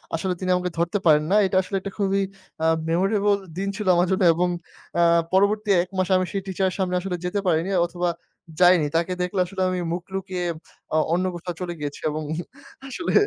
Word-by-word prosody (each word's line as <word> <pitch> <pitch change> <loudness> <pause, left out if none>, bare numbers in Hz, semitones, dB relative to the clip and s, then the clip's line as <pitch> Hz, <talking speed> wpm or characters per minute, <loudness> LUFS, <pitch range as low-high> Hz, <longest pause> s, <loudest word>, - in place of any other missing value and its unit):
আসলে 180 +3 -1
তিনি 185 -1 -3
আমাকে 180 0 -1
ধরতে 170 +4 +1
পারেন 150 -1 +5
না। - - +4
এটা 185 0 +1
আসলে 190 +2 -5
একটা 200 +1 -6
খুবই 195 -1 +1 0.4
আ - - +2 0.2
মেমোরেবল 200 +3 +2 0.2
দিন 195 +1 -2
ছিল 210 -3 -4
আমার 175 +1 +3
জন্য 190 0 +2
এবং 180 +2 +1 0.5
আ - - +5 0.3
পরবর্তী 205 +2 +2
১ 180 - -12
মাস 185 -1 +1
আমি 185 - +1
সেই 195 -1 -2
টিচার 190 0 0
এর - - -8
সামনে 180 -1 0
আসলে 180 -1 -3
যেতে 180 +3 -1
পারিনি, 170 +1 +2 0.2
অথবা 175 0 -2 0.5
যাইনি। 180 -3 +6
তাকে 170 +2 +1
দেখলে 180 +2 -1
আসলে 190 +1 -5
আমি 185 0 -1
মুখ 175 0 -3
লুকিয়ে, 190 -2 -3 0.5
আ - - +3 0.2
অন্য 180 +2 +1
কোথাও 175 +1 -5
চলে 175 -1 -3
গিয়েছি 145 -1 -5
এবং 155 +1 -3 0.7
আসলে 340 +6 -3
185 Hz, 200 wpm, -24 LUFS, 175-195 Hz, 0.7 s, যাইনি